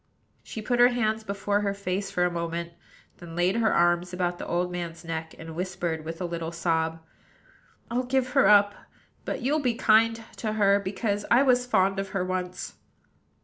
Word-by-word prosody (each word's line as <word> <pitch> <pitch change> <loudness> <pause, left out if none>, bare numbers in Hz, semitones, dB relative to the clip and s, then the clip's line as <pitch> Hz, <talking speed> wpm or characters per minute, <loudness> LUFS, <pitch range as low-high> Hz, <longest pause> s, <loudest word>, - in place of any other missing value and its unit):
She 220 - -7
put 240 +2 0
her 245 - +8
hands 220 -3 0
before 200 0 -1
her 200 -1 -1
face 195 0 -3
for 180 -2 +1
a 180 - 0
moment; 170 0 -4 0.4
then 170 -2 -10
laid 180 +4 +2
her 225 -1 +2
arms 175 +1 +2
about 175 -1 -1
the - - -6
old 180 +1 -1
man's 170 -1 -6
neck, 160 -1 -5
and 165 0 -9
whispered, 175 -3 -3
with 165 +1 -6
a 180 - -2
little 170 -1 -4
sob: 165 -1 -1 0.9
"I'll 245 +2 +1
give 260 0 +1
her 275 - +4
up; 205 -1 +6 0.5
but - - -4
you'll 295 +5 +2
be 250 -5 0
kind 225 0 +3
to 215 -2 -2
her, 200 -2 +4
because 205 +1 -2
I 245 +3 +6
was 250 -2 +3
fond 195 -4 +2
of 195 0 -3
her 185 - 0
once." 185 0 -4
190 Hz, 190 wpm, -26 LUFS, 175-220 Hz, 0.9 s, her